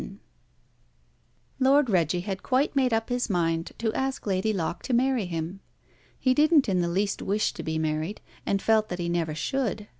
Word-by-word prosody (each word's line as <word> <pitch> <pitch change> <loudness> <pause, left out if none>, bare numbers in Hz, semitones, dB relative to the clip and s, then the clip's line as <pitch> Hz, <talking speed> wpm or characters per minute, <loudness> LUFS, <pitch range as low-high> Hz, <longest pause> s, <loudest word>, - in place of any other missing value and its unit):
Lord 275 +1 +4
Reggie 175 -4 +1
had 190 +1 -4
quite 270 +3 +1
made 260 -2 +3
up 225 +1 0
his 245 -1 -1
mind 165 -3 0
to 225 -1 -1
ask 265 0 -2
Lady 195 +1 +1
Locke 170 -4 -2
to 255 - -1
marry 255 -3 +2
him. 165 +2 -4 0.6
He 255 - +2
didn't 300 +1 +4
in 185 -3 +1
the 170 - 0
least 195 +3 -1
wish 205 +2 0
to - - -6
be 160 0 -2
married, 155 +5 -2 0.2
and 195 -1 -1
felt 220 -1 +3
that 180 - -3
he 175 -1 -2
never 165 -3 -1
should. 210 - -2
205 Hz, 180 wpm, -26 LUFS, 170-250 Hz, 0.6 s, Lord